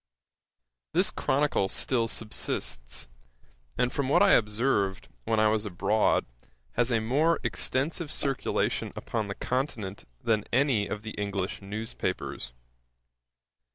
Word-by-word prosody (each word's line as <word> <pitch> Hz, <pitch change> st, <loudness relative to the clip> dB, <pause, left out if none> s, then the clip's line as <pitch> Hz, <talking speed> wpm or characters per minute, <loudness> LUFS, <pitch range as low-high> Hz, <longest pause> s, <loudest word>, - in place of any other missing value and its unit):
This -, -, +5 dB
Chronicle 140 Hz, -8 st, +1 dB
still 115 Hz, +1 st, +1 dB
subsists, -, -, -2 dB, 0.7 s
and 125 Hz, +2 st, +1 dB
from 140 Hz, -2 st, -1 dB
what 145 Hz, -, +5 dB
I 200 Hz, -, +6 dB
observed, 105 Hz, -3 st, +2 dB, 0.2 s
when 110 Hz, -, +2 dB
I 110 Hz, 0 st, +5 dB
was 110 Hz, -1 st, +1 dB
abroad, 100 Hz, +2 st, +2 dB, 0.5 s
has 120 Hz, +1 st, +2 dB
a 115 Hz, -, +3 dB
more 145 Hz, +9 st, +2 dB
extensive 150 Hz, +4 st, 0 dB
circulation 135 Hz, -2 st, 0 dB
upon 110 Hz, -3 st, -2 dB
the 100 Hz, -, -4 dB
Continent 120 Hz, -7 st, -3 dB
than 110 Hz, -2 st, +1 dB
any 125 Hz, -5 st, +3 dB
of 105 Hz, -, -4 dB
the 110 Hz, -, -5 dB
English 100 Hz, -2 st, -3 dB
newspapers. 100 Hz, -, -4 dB
110 Hz, 120 wpm, -28 LUFS, 105-130 Hz, 0.7 s, I